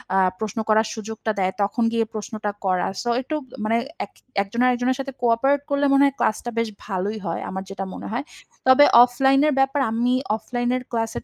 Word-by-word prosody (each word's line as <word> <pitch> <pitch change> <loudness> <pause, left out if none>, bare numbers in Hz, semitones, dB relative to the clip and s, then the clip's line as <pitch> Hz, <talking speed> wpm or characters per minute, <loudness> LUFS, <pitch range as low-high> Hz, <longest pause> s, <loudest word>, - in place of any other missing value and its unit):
আ - - +4 0.2
প্রশ্ন 220 0 -3
করার 220 +1 +4
সুযোগটা 220 0 -4
দেয়, 185 -1 +1
তখন 200 +4 0
গিয়ে 230 -1 +1
প্রশ্নটা 215 -1 -4
করা। 185 -1 +1
সো 240 - -3
একটু 310 +4 -4 0.3
মানে 225 +2 +2 0.3
এক - - -25 0.3
একজন 220 +5 -3
আরেকজনের 250 +1 +1
সাথে 270 0 -4
কো-অপারেট 245 +4 +2
করলে 285 0 +1
মনে 275 - +5
হয় 275 -1 +1
ক্লাসটা 220 +2 0
বেশ 230 -1 +1 0.2
ভালোই 200 +1 -2
হয়। 165 -1 -3
আমার 190 0 -4
যেটা 195 0 -5
মনে - - -7
হয়। 240 +5 -2 0.4
তবে 260 +2 +8 0.2
অফলাইনের 270 +4 +3
ব্যাপার 270 +1 +1
আমি 230 +1 -1 0.3
অফলাইনের 245 +2 -2
ক্লাসের 225 -1 -2
230 Hz, 180 wpm, -23 LUFS, 215-260 Hz, 0.4 s, তবে